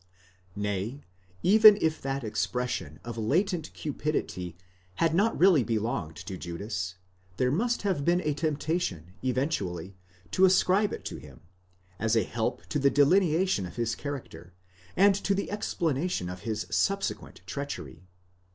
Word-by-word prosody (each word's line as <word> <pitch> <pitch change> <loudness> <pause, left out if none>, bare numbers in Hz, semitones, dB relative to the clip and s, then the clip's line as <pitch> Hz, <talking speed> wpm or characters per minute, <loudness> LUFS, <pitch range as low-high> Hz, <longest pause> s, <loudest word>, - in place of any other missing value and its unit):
Nay, 105 +6 -3 0.4
even 215 +1 +8
if 160 -3 0
that 135 0 -2
expression 110 -8 -2
of 115 -1 -6
latent 165 - 0
cupidity 135 - -3 0.4
had 165 - +2
not 205 +7 +2
really 175 -7 +6
belonged 110 -7 -2
to 95 0 -7
Judas, 90 +1 -4 0.4
there 125 0 +2
must 235 - 0
have 190 -8 0
been 175 +3 +3
a 150 - 0
temptation 145 - -2
eventually 100 - -2 0.4
to 190 - +5
ascribe 190 +2 +3
it - - -6
to - - -5
him, - - -13 0.6
as 110 +1 +1
a 110 - +4
help 115 +3 -3
to 150 - 0
the 140 0 +4
delineation 160 - +3
of 85 - -12
his 115 -1 -1
character, 130 -11 -7 0.4
and 200 +1 +6
to 200 0 0
the 200 - -3
explanation 165 - -1
of 90 - -7
his 110 -1 -2
sub 195 0 +1
sequent - - -5
treachery. 90 - -6
140 Hz, 140 wpm, -28 LUFS, -, 0.6 s, even